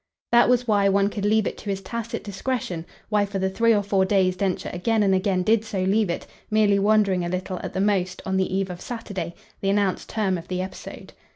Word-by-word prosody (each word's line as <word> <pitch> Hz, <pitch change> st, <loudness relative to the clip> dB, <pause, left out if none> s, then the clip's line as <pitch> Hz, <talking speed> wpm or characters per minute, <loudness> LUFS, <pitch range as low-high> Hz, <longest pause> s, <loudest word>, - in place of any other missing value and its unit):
That 240 Hz, +1 st, +6 dB
was 250 Hz, 0 st, +2 dB
why 200 Hz, -2 st, +3 dB
one 200 Hz, +1 st, +2 dB
could 205 Hz, -1 st, -3 dB
leave 215 Hz, 0 st, +3 dB
it -, -, -4 dB
to 210 Hz, -, -7 dB
his 195 Hz, -1 st, -1 dB
tacit 230 Hz, +3 st, -5 dB
discretion, 200 Hz, -5 st, -3 dB, 0.2 s
why 210 Hz, -1 st, +3 dB
for 200 Hz, 0 st, -4 dB
the 190 Hz, 0 st, 0 dB
three 230 Hz, +4 st, +3 dB
or 205 Hz, -2 st, +3 dB
four 195 Hz, -1 st, +2 dB
days 190 Hz, -1 st, +2 dB
Densher 190 Hz, -1 st, -2 dB
again 215 Hz, +5 st, +1 dB
and 195 Hz, -1 st, +3 dB
again 185 Hz, -1 st, +1 dB
did 220 Hz, +2 st, +3 dB
so 200 Hz, -4 st, -2 dB
leave 200 Hz, +1 st, +2 dB
it; 170 Hz, -, -3 dB, 0.2 s
merely 210 Hz, -2 st, +3 dB
wondering 200 Hz, -3 st, +3 dB
a 175 Hz, -, -2 dB
little, 185 Hz, 0 st, -3 dB
at -, -, -6 dB
the 190 Hz, -, -1 dB
most, 190 Hz, -3 st, +1 dB
on 190 Hz, -, -1 dB
the 190 Hz, -1 st, 0 dB
eve 190 Hz, 0 st, -1 dB
of 175 Hz, -, -8 dB
Saturday, 195 Hz, -8 st, -5 dB, 0.2 s
the 195 Hz, -, -1 dB
announced 200 Hz, -1 st, 0 dB
term 195 Hz, -5 st, 0 dB
of 165 Hz, -, -12 dB
the 185 Hz, 0 st, -3 dB
episode. 185 Hz, 0 st, -7 dB
195 Hz, 235 wpm, -24 LUFS, 185-215 Hz, 0.2 s, That